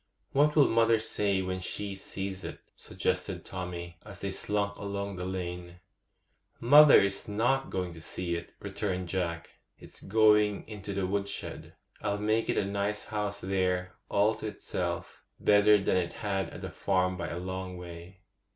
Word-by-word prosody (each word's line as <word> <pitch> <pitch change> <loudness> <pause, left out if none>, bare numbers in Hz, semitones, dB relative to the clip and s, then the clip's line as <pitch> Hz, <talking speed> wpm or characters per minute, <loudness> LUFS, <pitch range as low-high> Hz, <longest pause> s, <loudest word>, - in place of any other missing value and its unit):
'What 150 +2 +3
will 145 -3 +7
mother 115 0 +4
say 105 -3 0
when 95 0 -2
she 100 +2 -4
sees 95 0 -5
it?' - - -6 0.2
suggested - - -2
Tommy, 85 -2 -6
as 105 -3 -10
they 100 - -3
slunk 100 +1 -1
along 100 0 -4
the 90 0 -4
lane. 90 -1 -5 0.8
'Mother 145 +4 +9
is 100 +3 0
not 120 +6 +1
going 90 -2 -3
to 80 - -11
see 85 +1 -3
it,' 85 0 -6
returned 95 -3 -3
Jack; 85 -2 -2 0.3
'it's - - -11
going 105 0 +4
into 100 -2 -6
the 100 -1 0
wood 100 +1 -1
shed. 100 - -7 0.3
I'll 100 0 0
make 110 +2 +1
it - - +1
a - - +2
nice 100 +1 -2
house 105 -1 -3
there, 90 -1 0 0.2
all 105 +2 +3
to 110 0 -6
itself—better 105 0 +1
than 95 - +2
it 85 -2 -1
had 95 -2 -2
at - - -9
the - - -5
farm 95 -1 +1
by 85 -2 -4
a 85 - -4
long 95 0 -5
way. 90 +2 -10
100 Hz, 165 wpm, -30 LUFS, 90-105 Hz, 0.8 s, Mother